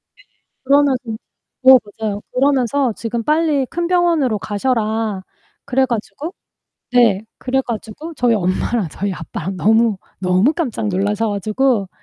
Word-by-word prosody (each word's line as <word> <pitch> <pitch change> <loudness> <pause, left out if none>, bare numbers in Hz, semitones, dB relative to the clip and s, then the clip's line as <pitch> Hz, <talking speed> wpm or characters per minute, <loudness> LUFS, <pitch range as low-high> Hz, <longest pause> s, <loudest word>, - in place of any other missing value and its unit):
네 - - -22 0.4
그러면서 280 0 +4 0.7
네 260 0 +9 0.3
맞아요. 205 -2 -2
그러면서 265 -2 +2
지금 230 +1 -4
빨리 305 -1 +2
큰 345 +4 -2
병원으로 335 - +2
가셔라. 215 -2 -1 0.4
그래 265 -1 +2
가지고 240 - -4 0.6
네 220 -5 +4
그래 265 +1 0
가지고 235 +8 -6
저희 245 -4 +2
엄마랑 190 +1 0
저희 200 +5 -3
아빠랑 180 +1 -5
너무, 220 +1 +3 0.2
너무 185 +8 +3
깜짝 260 -10 -2
놀라셔 205 +3 0
가지고 215 +1 0
235 Hz, 290 characters per minute, -18 LUFS, 205-275 Hz, 0.7 s, 네